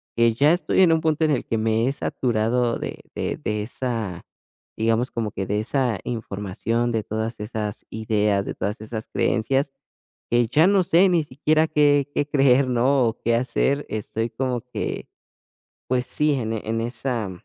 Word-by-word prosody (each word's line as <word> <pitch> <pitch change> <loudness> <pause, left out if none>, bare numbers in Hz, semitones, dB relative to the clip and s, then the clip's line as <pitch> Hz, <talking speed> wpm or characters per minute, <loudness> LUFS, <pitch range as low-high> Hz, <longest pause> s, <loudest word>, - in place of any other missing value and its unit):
que 115 -1 +4
ya 145 +8 +4
estoy 185 +1 +1
en 175 - +6
un 160 - +1
punto 160 0 +1
en 155 - +2
el 130 - 0
que 115 - -1
me 110 +2 +1
he 135 - +1
saturado 120 -2 0
de - - -5 0.2
de - - -2
de 105 +6 -2
esa, 110 -6 -4 0.5
digamos, 115 +2 +1
como 115 -2 -2
que 95 - -4
de 105 +1 0
esa 120 -2 0
información, 115 +1 -2
de 110 -2 -1
todas 110 +1 -4
esas 105 -1 -4
ideas, 105 -2 +1
de - - -5
todas 105 +3 -3
esas 110 0 -6
creencias, 135 +4 0 0.6
que 120 -1 +3
ya 155 +8 +4
no 200 -1 +4
sé 180 +2 +4
ni 170 -3 +2
siquiera 155 +3 +1
qué 145 -2 +3
qué 145 - +1
creer, 135 -2 +4
¿no?, 125 +1 +3
o 115 - -4
qué 115 0 +2
hacer. 135 +3 0
Estoy 110 +2 -3
como 125 0 -2
que 125 +1 -5 0.8
pues 125 0 +1
sí, 150 -1 +2
en 115 -4 -2
en 110 +1 -2
esa 120 -3 -2
120 Hz, 175 wpm, -23 LUFS, 110-140 Hz, 0.8 s, en